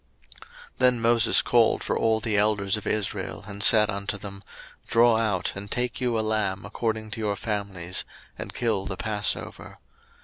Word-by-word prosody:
02:012:021 -, -, -17 dB, 0.3 s
Then 125 Hz, -1 st, +4 dB
Moses 115 Hz, 0 st, +4 dB
called 120 Hz, -2 st, +2 dB
for -, -, -1 dB
all 110 Hz, -1 st, +1 dB
the 110 Hz, 0 st, -1 dB
elders 100 Hz, -1 st, +2 dB
of 105 Hz, -, -6 dB
Israel, 110 Hz, -2 st, -2 dB
and 100 Hz, -1 st, -7 dB
said 105 Hz, 0 st, +7 dB
unto 100 Hz, +1 st, -4 dB
them, 100 Hz, 0 st, -9 dB, 0.5 s
Draw 115 Hz, 0 st, +4 dB
out 100 Hz, -5 st, -1 dB
and 100 Hz, +1 st, -7 dB
take 125 Hz, +2 st, -1 dB
you 120 Hz, -2 st, 0 dB
a -, -, +1 dB
lamb 105 Hz, -3 st, -1 dB
according 110 Hz, +1 st, -3 dB
to 115 Hz, -, -6 dB
your 105 Hz, -2 st, -1 dB
families, 100 Hz, -5 st, -4 dB, 0.3 s
and -, -, -7 dB
kill 110 Hz, -5 st, -1 dB
the 95 Hz, -, -4 dB
passover. 105 Hz, 0 st, -3 dB
105 Hz, 170 wpm, -25 LUFS, 100-115 Hz, 0.5 s, said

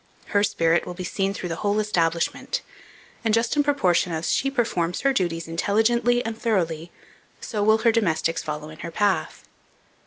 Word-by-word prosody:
Her 205 Hz, 0 st, +2 dB
spirit 165 Hz, -4 st, +2 dB
will 180 Hz, -, -6 dB
be 185 Hz, -, -6 dB
seen 195 Hz, +2 st, -1 dB
through 185 Hz, -3 st, -5 dB
the 165 Hz, -, -3 dB
whole 205 Hz, +2 st, 0 dB
establishment; 170 Hz, -, 0 dB, 0.6 s
and 225 Hz, -1 st, +2 dB
just 230 Hz, +3 st, +1 dB
in 295 Hz, -, +4 dB
proportion 190 Hz, -12 st, +2 dB
as 160 Hz, 0 st, -1 dB
she 275 Hz, -, +1 dB
performs 200 Hz, -10 st, -1 dB
her 275 Hz, 0 st, +2 dB
duties 165 Hz, -6 st, -1 dB
intelligently 235 Hz, +8 st, +2 dB
and 225 Hz, 0 st, -3 dB
thoroughly, 170 Hz, -8 st, -1 dB, 0.5 s
so 210 Hz, -, -3 dB
will 220 Hz, +1 st, +5 dB
her 230 Hz, +1 st, +3 dB
domestics 165 Hz, -7 st, 0 dB
follow 150 Hz, -1 st, -5 dB
in 155 Hz, -, -13 dB
her 170 Hz, -, -5 dB
path. 200 Hz, +3 st, 0 dB
195 Hz, 175 wpm, -24 LUFS, 165-225 Hz, 0.6 s, will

